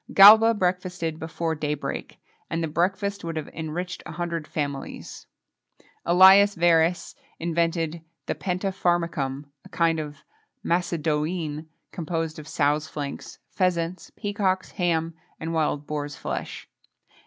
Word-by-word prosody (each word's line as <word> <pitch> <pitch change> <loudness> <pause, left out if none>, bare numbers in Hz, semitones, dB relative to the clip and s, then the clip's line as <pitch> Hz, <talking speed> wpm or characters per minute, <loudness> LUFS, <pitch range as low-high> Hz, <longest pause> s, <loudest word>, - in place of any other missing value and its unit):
[XXII - - -11
27] 195 - +10
Galba 225 +1 +4
breakfasted 180 -3 -1
before 160 0 -2
day 150 -1 -2
break, 145 - -6 0.3
and 165 0 -1
the - - 0
breakfast 195 +5 -1
would 165 -1 -4
have 155 -2 -4
enriched 170 +3 -5
a - - -7
hundred 170 -2 -3
families.[XXII 140 -2 -7 0.3
28] 175 - +3 0.2
Ælius 205 0 +1
Verus 170 0 +3 0.2
invented 165 0 -1 0.2
the - - -1
pentapharmacum, 175 -7 -1 0.2
a - - -14
kind 165 -1 +1
of 150 -1 -6 0.5
Macédoine, 160 -2 -1 0.2
composed 165 -1 -3
of 155 - -10
sows' 150 +1 +1
flanks, 140 -1 -6
pheasants, 180 -1 -1
peacocks, 195 -2 -1
ham, 165 -2 0 0.3
and 165 +1 -4
wild 150 -2 0
boars' 145 -1 -4
flesh. - - -5
165 Hz, 130 wpm, -25 LUFS, 155-180 Hz, 0.5 s, 27